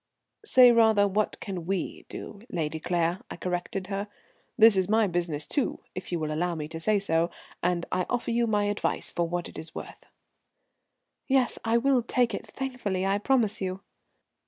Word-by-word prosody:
"Say, 255 - +7
rather, 220 -3 +5
what 205 +2 -1
can 180 -4 -5
we 190 -3 -3
do, 205 - -8
Lady 160 -2 -2
Claire," 170 +2 0
I - - -6
corrected 180 +1 -3
her. 200 +1 -3 0.5
"This 220 -2 +7
is 190 0 +1
my 220 0 +4
business, 170 -5 -1
too, 280 - -1
if 185 - -7
you 175 - 0
will 155 -1 -2
allow 175 +2 -1
me 150 -2 -4
to 165 - -6
say 210 +6 +2
so, 170 -4 +1 0.3
and 175 -1 0
I 185 -1 0
offer 245 -1 -1
you 235 0 +2
my 210 -2 +2
advice 205 0 -1
for 170 -1 0
what 175 0 -2
it - - -9
is 160 0 -10
worth." - - -9 1.2
"Yes, 260 -2 +2
I 230 +1 +3
will 260 +1 +3
take 240 0 +1
it - - -5
thankfully, 245 -8 -3
I 195 +1 +1
promise 225 -3 +1
you." 185 0 -3
195 Hz, 180 wpm, -27 LUFS, 175-225 Hz, 1.2 s, Say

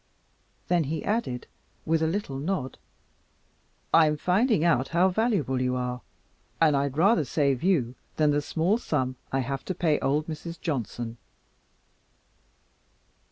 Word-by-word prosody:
Then 175 -3 +2
he 155 +3 -3
added, 205 - -1 0.4
with 160 0 +1
a 160 - +2
little 160 -6 -3
nod, 150 -4 -3 1.1
"I'm 155 -2 +5
finding 195 - +2
out 135 -6 +3
how 175 +3 +3
valuable 180 - 0
you 125 0 0
are, 125 0 -3 0.6
and 155 -3 +4
I'd 140 0 -1
rather 185 0 +4
save 140 -2 0
you 155 -10 +1 0.2
than 150 -1 +3
the 145 0 +1
small 170 +9 0
sum 130 - -1 0.2
I 135 - +1
have 135 +1 -4
to 185 - -3
pay 160 -4 +1
old 145 +3 0
Mrs. 165 +1 -7
Johnson." 120 - -3
155 Hz, 135 wpm, -27 LUFS, 135-175 Hz, 1.1 s, I'm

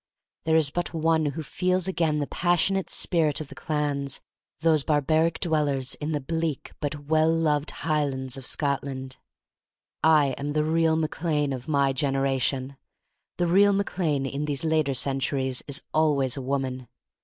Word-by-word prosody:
There 160 0 +3
is 155 -3 +3
but 175 +1 -3
one 160 -1 +2
who 145 +3 -4
feels 185 +4 0
again 165 -5 +1
the 145 - 0
passionate 175 +4 +1
spirit 160 -5 +2
of 155 -3 -7
the - - -9
clans, 145 -3 -2 0.4
those 160 -3 +3
barbaric 155 +3 +2
dwellers 145 -6 0
in 150 +1 -4
the 150 - 0
bleak, 160 0 -3
but 145 0 -4
well 155 +1 +3
beloved 155 -3 +1
Highlands 140 -5 -1
of 135 -2 -6
Scotland. 135 -2 -2 0.9
I 150 -4 +5
am 145 +1 -3
the 150 0 +2
real 160 +1 +2
Mac 160 0 -2
Lane 150 -4 +1
of 130 0 -7
my 140 -3 +2
gener 135 0 0
ation. 135 0 -1 0.6
The 175 - +1
real 200 +4 +5
Mac 200 0 -2
Lane 150 -6 +1
in 140 +2 -3
these 145 -1 -2
later 155 -4 +1
centuries 135 0 -1
is 140 +3 -4
always 145 -5 +2
a 135 - -4
woman. 130 -1 -3
150 Hz, 165 wpm, -26 LUFS, 135-160 Hz, 0.9 s, I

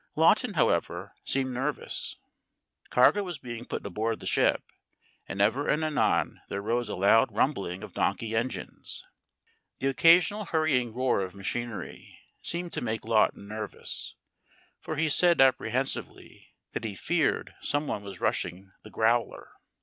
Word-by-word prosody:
Lawton, - - +4
however, - - 0
seemed 130 -1 0
nervous. 135 +4 -3 0.7
Cargo 125 +11 +5
was 180 -5 -5
being 120 -2 -7
put - - -5
aboard 110 +4 -2
the - - -10
ship, - - +2 0.6
and 100 - -5
ever 115 +8 +2
and 150 +1 +2
anon 155 -1 +1
there 100 - -3
rose 115 +3 -1
a - - -3
loud 100 +5 +4
rumbling 100 -5 -1
of 105 - -9
donkey 110 +3 -1
engines. 120 +3 -4 0.7
The 135 - 0
occasional 175 +8 +5
hurrying 155 -8 +1
roar 125 -2 +1
of 95 0 -5
machinery 115 +3 -5 0.2
seemed 175 0 -4
to - - -2
make 110 -2 -3
Lawton 110 -2 +2
nervous, 105 -1 -5 0.6
for 155 -1 -5
he 160 +2 +1
said 170 +3 +3
apprehensively 130 0 0 0.3
that - - -3
he 105 -3 -4
feared 165 - 0
someone 145 -7 -1
was 100 -3 -9
rushing 95 +3 -2
the 110 - -12
growler. 115 +2 0
120 Hz, 140 wpm, -28 LUFS, 110-150 Hz, 0.7 s, Cargo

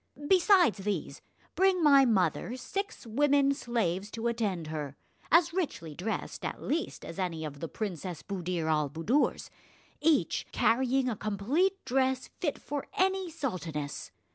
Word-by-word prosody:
Besides 365 - +5
these, 190 -8 -3 0.3
bring 370 0 +3
my 280 -3 +7
mother 225 +2 +1
six 395 +7 -5
women 280 +4 +3
slaves 210 -7 -1
to 225 +1 -6
attend 215 -8 -1
her, 150 -3 -5 0.4
as 335 0 +5
richly 285 - -3
dressed 190 +9 -4
at - - -3
least 320 +3 -3
as 165 - -8
any 165 -4 -2
of 145 -2 -7
the 165 - -4
Princess 180 -4 -5
Buddir 180 -4 -3
al 150 -2 +1
Buddoor's, 165 - 0 0.5
each 315 -1 +2
carrying 260 +2 +2
a 240 - 0
complete 255 - 0
dress 260 0 0
fit 300 -5 -1
for 290 -1 -5
any 380 -1 +1
sultaness. 170 - -4
235 Hz, 140 wpm, -30 LUFS, 175-295 Hz, 0.5 s, my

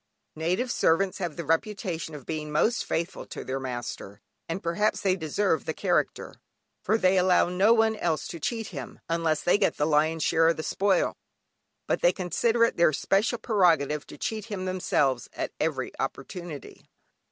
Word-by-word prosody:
Native 180 +11 -1
servants 185 +1 +2
have 175 -5 -3
the 170 - -5
reputation 165 -1 -2
of 140 - -10
being 155 -1 -4
most 220 +10 +2
faithful 170 +3 -3
to - - -7
their 130 +1 -3
master, 120 -5 -6 0.3
and 175 +4 -3
perhaps 180 +6 0
they 190 -2 +2
deserve 160 -1 0
the - - -3
character, - - -1 0.4
for 215 +3 +2
they 185 -2 +3
allow 180 -1 +4
no 190 +5 +3
one 225 -1 +4
else 160 -7 -1
to 170 - -6
cheat 225 +5 -3
him 140 -8 -8
(unless 165 -2 0
they 180 - +3
get 200 - +1
the 150 - +1
lion's 155 +1 +2
share 165 -1 +3
of 165 - +2
the 155 - -4
spoil), 195 +1 +1 0.7
but - - -1
they 175 - +5
consider 225 +6 +1
it 230 - +2
their 170 -2 +4
special 200 - +1
prerogative 165 - +2
to - - -11
cheat 215 -2 -3
him 200 -4 -5
themselves 140 - 0
at - - -3
every - - -1
opportunity. 170 -5 -6
175 Hz, 175 wpm, -27 LUFS, 155-200 Hz, 0.7 s, they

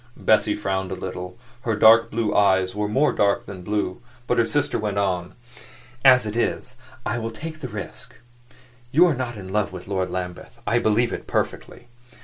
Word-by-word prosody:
Bessie 105 -1 +3
frowned 95 -2 -2
a - - -2
little; 90 0 -6 0.2
her 115 -3 -1
dark 115 +2 +6
blue 110 -2 -1
eyes 95 -2 +3
were 105 +1 -1
more 135 +8 +2
dark 100 -1 +1
than 95 -2 -8
blue. 105 -1 -2 0.2
But 125 - +1
her 115 - +3
sister 145 +2 0
went 105 -1 -2
on. 90 -2 -1 0.7
"As 125 -3 +7
it 105 0 -4
is, 120 - -1 0.3
I 120 +2 -1
will 115 0 -3
take 155 +8 -8
the 130 - -5
risk. 110 +4 -8 0.8
You 165 +7 +6
are 170 - +3
not 125 -3 -4
in 95 -2 -8
love 105 -1 +1
with 90 -1 -9
Lord 95 -2 -1
Lambeth: 90 -1 -6
I - - +2
believe 115 +2 +2
it, - - -6
perfectly. 120 - -3
105 Hz, 185 wpm, -23 LUFS, 95-120 Hz, 0.8 s, As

